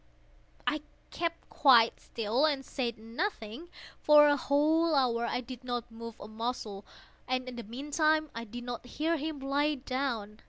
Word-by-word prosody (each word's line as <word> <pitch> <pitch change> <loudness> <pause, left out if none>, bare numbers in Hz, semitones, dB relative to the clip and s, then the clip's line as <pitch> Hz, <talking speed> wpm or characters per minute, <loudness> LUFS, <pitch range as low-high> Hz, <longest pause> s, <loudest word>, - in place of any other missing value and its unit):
I 300 0 0 0.3
kept 335 -1 -3
quite 240 -5 +5
still 230 +5 0
and 275 -3 -1
said 240 -4 -3
nothing. 230 - -4 0.3
For 300 0 +7
a 290 - +5
whole 310 +3 +2
hour 235 -3 +2
I - - -1
did 255 0 -9
not 245 -2 -4
move 230 0 -9
a - - -8
muscle, 220 -2 -4 0.4
and 255 0 -1
in 250 - -6
the 240 - -5
meantime 300 - 0
I 230 0 -5
did 240 +2 -8
not 240 -1 -5
hear 315 +6 -1
him 305 0 -4
lie 285 +2 +1
down. 255 -6 -3
255 Hz, 160 wpm, -31 LUFS, 230-295 Hz, 0.4 s, For